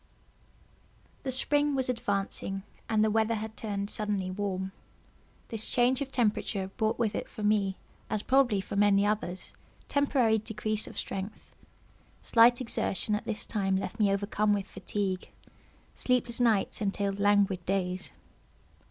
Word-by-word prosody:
The 265 - -3
spring 290 +2 +2
was 260 -1 0
advancing, 200 -4 -2 0.3
and 215 -1 +3
the 215 - +2
weather 220 +1 +2
had 220 0 -5
turned 200 -2 -3
suddenly 205 -3 -2
warm. 190 -1 -2 0.8
This 225 -1 -1
change 250 +2 +3
of 275 - -2
temperature 210 -5 0
brought 220 0 0
with 225 -3 0
it - - -4
for 215 - -7
me, 205 -2 +2 0.3
as 215 -1 -1
probably 255 -7 +3
for 195 - -6
many 200 0 +4
others, 205 -3 -2 0.4
temporary 260 -6 +2
decrease 215 0 -2
of - - -10
strength. 195 +3 -6 0.7
Slight 235 +1 +6
exertion 215 -3 0
at 210 - -1
this 220 -2 -2
time 195 -3 0
left 190 +3 -4
me 205 -2 +4
overcome 205 +1 +1
with 200 -1 -2
fatigue—sleepless 205 +5 -3
nights 225 -5 +2
entailed 200 -1 -1
languid 200 -3 +3
days. 185 -1 -1
210 Hz, 135 wpm, -29 LUFS, 195-230 Hz, 0.8 s, Slight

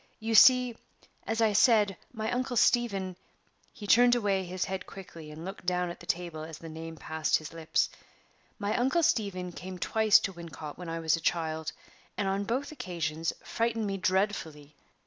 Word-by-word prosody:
You 225 +1 -2
see, 250 +1 +7 0.5
as 225 +1 0
I 220 -2 +3
said, 210 -2 +4 0.2
my 220 -2 -3
Uncle 250 0 -1
Stephen" 200 -7 +2 0.6
he 210 - -10
turned 245 +3 +6
away 200 -5 +1
his 185 +1 -3
head 190 0 -5
quickly, 170 -5 -10
and 155 +2 -9
looked 195 +2 -7
down 180 -1 0
at - - -10
the 175 - -13
table 170 -3 -2
as 160 -1 -8
the 165 - -10
name 160 +1 -7
passed 160 0 0
his 155 0 -9
lips 165 -1 +1 0.7
"my 205 +1 -1
Uncle 265 +8 +2
Stephen 185 - 0
came 185 +1 -8
twice 220 +3 +4
to 195 - -3
Wincot 160 -3 -9
while 175 -2 -6
I 165 - -3
was 160 -1 +2
a - - -5
child, 160 -2 -1 0.5
and 200 - 0
on 195 +1 -1
both 260 +7 -2
occasions 170 - -3
frightened 230 -1 -1
me 195 -1 -2
dreadfully. 185 -6 -1
190 Hz, 180 wpm, -29 LUFS, 165-220 Hz, 0.7 s, see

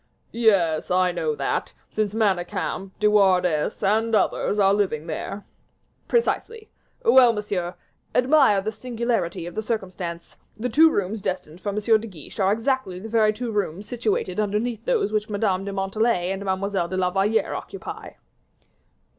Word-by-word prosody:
"Yes, 195 -9 +2
I 180 0 +3
know 160 -3 -1
that, 140 -1 -2 0.2
since 215 -1 -1
Manicamp, 195 -2 -1
De 210 - 0
Wardes, 185 -6 +2
and 220 +3 +2
others 210 - +1
are 195 -1 +4
living 185 -7 0
there." 195 +5 -5 0.6
"Precisely. 460 -1 -1 0.3
Well, 255 - +7
monsieur, 200 -5 -3 0.4
admire 250 -6 +4
the 215 +2 -3
singularity 230 -7 -2
of 175 - -7
the 220 - -2
circumstance; 185 -6 -5 0.2
the 245 +3 -2
two 320 +7 +6
rooms 205 -4 -2
destined 180 -2 -4
for 205 - -3
M. 200 - -3
de 220 +1 +2
Guiche 175 -4 -11
are 195 0 +3
exactly 230 -3 -1
the 220 +4 -8
very 220 -1 +3
two 230 +2 -4
rooms 205 -1 -2
situated 215 -5 -1
underneath 215 +3 -1
those 470 - +1
which 215 0 -1
Mademoiselle 200 -2 0
de 200 - -4
Montalais 195 -1 0
and 195 +1 -4
Mademoiselle 190 -2 -1
de 185 - -4
la 180 -1 +1
Valliere 200 +4 +1
occupy." - - -7
205 Hz, 155 wpm, -24 LUFS, 185-225 Hz, 0.6 s, Well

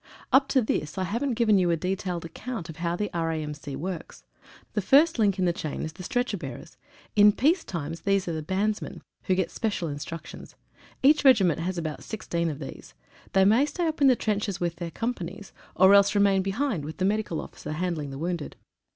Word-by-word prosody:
Up 270 +1 +6
to 260 -3 +2
this 155 -5 -2
I 190 - 0
haven't 235 +7 -1
given 215 -4 +4
you 180 -1 +2
a 170 - +2
detailed 180 -1 -3
account 195 0 -6
of 160 - -8
how 170 0 -1
the 205 +3 -3
R.A.M.C. 155 -4 -3
works. 175 +5 -6 0.5
The 210 - 0
first 285 - +4
link 205 -3 +3
in 185 - +1
the 175 - +2
chain 155 -3 -4
is 155 - -5
the 185 - -11
stretcher 245 +2 -1
bearers. 135 -5 -8 0.4
In 210 0 +7
peace 305 - +2
time 165 -3 -4
these 195 -2 +1
are 170 - -1
the 160 - -3
bandsmen, 200 +6 -2 0.2
who 185 - +2
get 185 -2 -1
special 205 -7 -2
instruc 150 +3 -6
tions. - - -11 0.5
Each 295 +3 +5
regiment 200 - +5
has 180 +2 -2
about 155 -3 -4
16 170 -6 -2
of 150 - -5
these. 100 - -9 0.4
They 190 0 +5
may 225 +7 +5
stay 340 +4 -2
up 315 -1 -3
in 280 - +7
the 255 - +6
trenches 205 -3 -1
with 170 -1 -2
their 170 -1 -4
companies, 200 -2 -5 0.2
or 190 +2 +6
else 200 +1 +5
remain 200 -1 +4
behind 195 - -1
with 155 +2 -7
the 185 - 0
medical 205 -5 0
officer 150 - -7
handling 160 -3 -2
the 135 - -7
wounded. 170 0 -3
190 Hz, 205 wpm, -26 LUFS, 165-215 Hz, 0.5 s, In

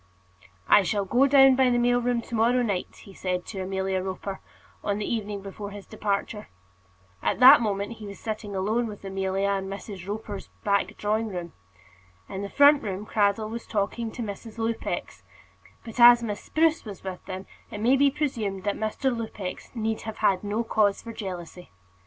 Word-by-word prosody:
"I - - +7
shall 200 +2 -1
go 250 +8 +4
down 270 -1 +7
by 260 -1 +4
the 240 - +2
mail 245 0 +3
train 240 -1 0
to - - -12
morrow 235 +3 +3
night," 200 -6 -3
he 195 - -13
said 180 -1 -3
to 195 -3 -6
Amelia 190 0 -1
Roper, 190 +1 -5 0.4
on 205 -1 0
the 210 - -3
evening 210 -3 -3
before 200 +1 -7
his 205 -1 -10
departure. 210 +1 -3 0.7
At - - 0
that 260 +1 +10
moment 205 +1 -2
he 215 - -9
was 200 -1 -8
sitting 215 -2 -5
alone 215 +5 0
with 205 -2 -9
Amelia 195 +1 -1
in 195 -1 -1
Mrs. 195 -1 -7
Roper's 205 -1 -5 0.2
back 200 -1 0
drawing 215 +2 0
room. 175 -4 -6 0.7
In 190 - -5
the 200 - -4
front 285 +3 +6
room 200 0 -4
Cradell 215 0 +1
was 230 0 -6
talking 220 +2 -1
to 240 - -4
Mrs. 215 +2 -7
Lupex; 225 0 -3 0.6
but 230 +1 -8
as 240 0 +9
Miss 210 -3 -3
Spruce 320 0 +1
was 205 -4 -9
with 185 -1 -6
them, 190 +1 -6 0.2
it 210 - -7
may 240 +5 +4
be 280 +1 +5
presumed 230 -10 -2
that 205 - 0
Mr. 240 +4 -1
Lupex 215 -5 -6
need 220 -1 -2
have 220 - -7
had 195 -3 +2
no 210 +3 -1
cause 210 -3 +1
for 230 - -7
jealousy. 180 -4 -7
210 Hz, 185 wpm, -26 LUFS, 195-235 Hz, 0.7 s, that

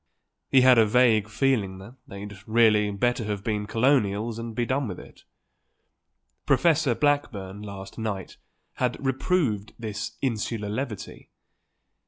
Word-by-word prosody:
He 130 - +6
had 130 -2 +7
a 110 - +6
vague 110 -2 +4
feeling 110 -6 0
that 100 +7 -12
they'd 100 +1 -8
really 110 -2 +4
better 120 +4 0
have 105 -2 -3
been 105 -2 -2
Colonials 115 -2 +1
and 115 -1 -6
be 120 - 0
done 130 +1 -1
with 95 - -6
it. - - -15 1.2
Professor 155 -7 +3
Blackburn 105 -10 -1
last 100 0 -9
night 105 -4 -4 0.4
had 125 -1 0
reproved 130 - 0
this 110 -2 -5
insular 110 -4 -2
levity. 105 -3 -5
110 Hz, 130 wpm, -26 LUFS, 105-125 Hz, 1.2 s, had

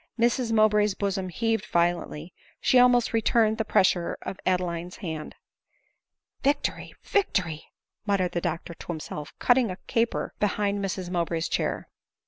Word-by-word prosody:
Mrs 235 0 +2
Mow 215 -1 +6
bray's 210 -1 +2
bosom 195 -2 -2
heaved 225 +2 -1
violently; 170 -1 -1 0.3
she 255 - +4
almost 245 -2 +4
returned 225 0 +2
the - - +2
pressure 185 -4 +2
of 190 - -6
Adeline's 180 -1 -1
hand. 160 -6 -6 1.1
"Victory, 285 +1 -1
victory 185 - 0 0.2
!" - - -57
muttered 190 -3 +1
the 175 - -2
doctor 170 +1 -3
to - - -13
himself, 150 -3 -5
cutting 245 -2 +3
a 185 - -5
caper 230 0 0
behind 205 -1 0
Mrs 185 -2 -3
Mowbray's 170 -2 -1
chair. - - -2
195 Hz, 140 wpm, -26 LUFS, 175-225 Hz, 1.1 s, Mow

